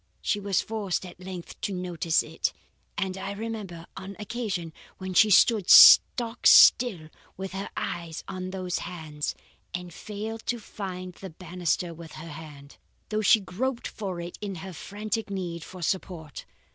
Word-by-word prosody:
She 205 - +1
was 200 -2 +1
forced 205 -4 -2
at 180 -1 -11
length 185 -2 -9
to 205 - -2
notice 175 -3 0
it, - - -2 0.4
and 190 -1 -1
I 195 +1 -4
remember, 200 -6 -6
an 195 0 -8
occasion 205 -7 -4 0.2
when 185 0 -5
she 215 +4 +6
stood 205 0 +5
stock 235 -1 +8
still 190 -11 +7 0.3
with 190 0 -5
her 195 +2 -5
eyes 170 -2 -4
on 185 -1 -5
those 185 -1 -3
hands, 155 -4 -5 0.4
and 180 -1 -6
failed 220 +4 -6
to 240 - -1
find 185 -4 -7
the 190 +2 -9
banister 175 0 -2
with 165 -1 -11
her 165 +1 -9
hand, 145 -2 -11 0.3
though 215 0 0
she 220 +1 +6
groped 235 +7 -3
for 190 -5 -5
it 170 +1 -7
in 200 -2 -4
her 190 - -7
frantic 210 +5 -4
need 175 -4 -4
for 185 -2 -9
support. 175 -5 -4
185 Hz, 160 wpm, -27 LUFS, 170-205 Hz, 0.4 s, stock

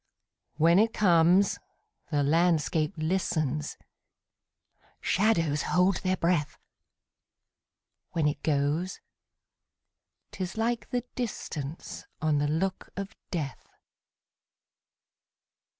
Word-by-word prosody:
When 165 +4 +5
it 225 +1 +2
comes, 180 0 +4 0.5
the 145 -2 +1
landscape 160 0 +2
listens, 155 -3 -1 1.2
Shadows 165 -8 +2
hold 180 +1 +2
their 185 0 0
breath; 165 -4 0 1.6
When 160 -3 +2
it 150 - -2
goes, 150 +4 0 1.3
't - - -9
is 185 +3 -4
like 225 -1 -1
the 245 -1 -1
distanceOn 155 - -3
the 145 - +1
look 185 +5 -1
of 200 +2 -5
death. 145 - -4
170 Hz, 85 wpm, -28 LUFS, 150-190 Hz, 1.6 s, When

